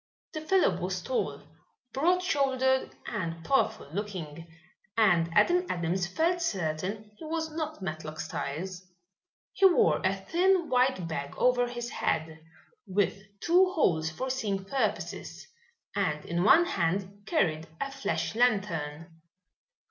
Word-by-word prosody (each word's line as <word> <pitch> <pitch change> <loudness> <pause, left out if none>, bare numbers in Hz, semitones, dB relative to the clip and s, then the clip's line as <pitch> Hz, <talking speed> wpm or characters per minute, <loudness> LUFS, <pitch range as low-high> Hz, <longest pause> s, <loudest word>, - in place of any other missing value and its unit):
The 310 - -4
fellow 375 +4 +2
was - - -2
tall, - - -2 0.5
broad 355 +7 +2
shouldered 265 -4 +2 0.2
and 165 -6 -4
powerful 270 - +1
looking, 170 -6 -5 0.5
and 175 -7 +4
Adam 355 - +4
Adams 175 +1 -1
felt 335 - +1
certain 195 - -2
he - - -8
was 320 0 -2
not 310 -7 -4
Matlock 155 -2 -5
Styles. 180 +6 -4 0.7
He 390 - +6
wore 355 - +3
a 190 +1 +2
thin 345 - +1
white 250 -8 +2
bag 140 -3 -4
over 245 -1 +3
his 240 0 -5
head, 160 0 -2 0.4
with 195 +1 0 0.2
two 365 +2 +4
holes 160 - +2
for 255 +12 -3
seeing 205 -7 -2
purposes, 215 -2 -3 0.5
and 155 -7 -1
in 170 +1 -1
one 325 - +7
hand 195 - -1
carried 160 - +1
a 275 - -3
flash 270 0 -2
lantern. 165 -9 -1
205 Hz, 125 wpm, -29 LUFS, 165-280 Hz, 0.7 s, one